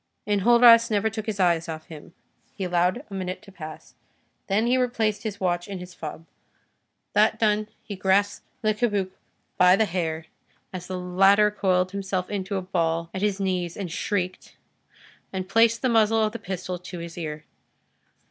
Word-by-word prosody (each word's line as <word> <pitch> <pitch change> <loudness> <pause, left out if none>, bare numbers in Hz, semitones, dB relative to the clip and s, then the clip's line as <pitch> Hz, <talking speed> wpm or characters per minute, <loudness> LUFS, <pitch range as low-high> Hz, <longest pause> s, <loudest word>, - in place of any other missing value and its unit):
Enjolras 230 +3 +6
never 220 0 +1
took 220 0 -5
his 210 -2 -3
eyes 170 -2 +2
off 160 -1 -5
of - - -31
him: 160 +1 -12 0.4
he 195 - -4
allowed 180 - +1
a - - -7
minute 185 -1 -4
to 195 - -14
pass, 155 -4 -10 0.5
then 210 +3 +2
he 245 +2 +3
replaced 230 -4 0
his 210 -3 -5
watch 175 -2 -1
in 200 -1 -5
his 180 0 -9
fob. 160 0 -8 0.9
That 215 +1 +4
done, 215 -1 +1 0.2
he 205 - -6
grasped 195 +2 +1 0.2
Le 215 0 +3
Cabuc 205 -4 0 0.5
by 180 0 +7
the 220 - +2
hair, 165 -4 -3 0.5
as 180 -1 -6
the 185 - -4
latter 195 +3 +4
coiled 185 -3 +1
himself 190 -1 -3
into 200 0 -3
a 190 - -2
ball 170 -2 -1
at 190 - -4
his 205 -1 0
knees 180 -3 -2
and 190 -5 -5
shrieked, 185 0 -3 0.7
and 185 -1 -4
placed 230 +3 +3
the - - +3
muzzle 225 -1 +3
of 215 - +1
the 230 - -7
pistol 185 -2 -5
to 180 0 -8
his 170 0 -7
ear. 155 -3 -6
190 Hz, 175 wpm, -25 LUFS, 180-215 Hz, 0.9 s, by